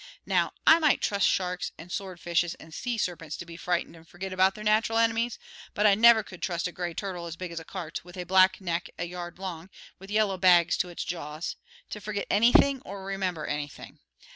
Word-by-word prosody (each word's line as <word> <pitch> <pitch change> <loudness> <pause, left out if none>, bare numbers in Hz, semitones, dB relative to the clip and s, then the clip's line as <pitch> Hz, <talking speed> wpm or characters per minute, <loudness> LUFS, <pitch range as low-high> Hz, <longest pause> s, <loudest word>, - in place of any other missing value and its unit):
Now, - - +1
I 325 - +8
might 305 -3 +3
trust 200 -1 +2
sharks 180 -1 -1
and 175 +2 -11
swordfishes 175 -3 -1
and 160 - -13
sea 240 +5 -3
serpents 165 -6 -3
to - - -7
be 170 0 -10
frightened 175 -1 -2
and 165 0 -16
forget 185 +3 -7
about 190 +1 +3
their 215 - -8
nat'ral 220 +1 +2
enemies, 230 +1 +1 0.4
but 210 - +2
I 205 - +7
never 225 +1 +7
could 185 - -12
trust 170 -1 -1
a - - -7
gray 175 -1 -4
turtle 180 -4 -4
as 165 - -6
big 180 0 -6
as 170 - -4
a - - -9
cart, 170 -2 -6
with 175 +1 -13
a 180 - -3
black 185 +1 +4
neck 170 -3 -3
a 175 - -2
yard 175 0 -7
long, 180 -2 -6 0.3
with 195 +1 -12
yellow 210 -2 +1
bags 175 -2 +5
to 180 - -1
its 175 - -5
jaws, 160 -1 -5 0.4
to 210 - -6
forget 205 -1 -3
anything 245 +5 +5
or 200 - -7
to - - -9
remember 190 -5 -2
anything. 145 -1 -6
185 Hz, 215 wpm, -28 LUFS, 170-200 Hz, 0.4 s, I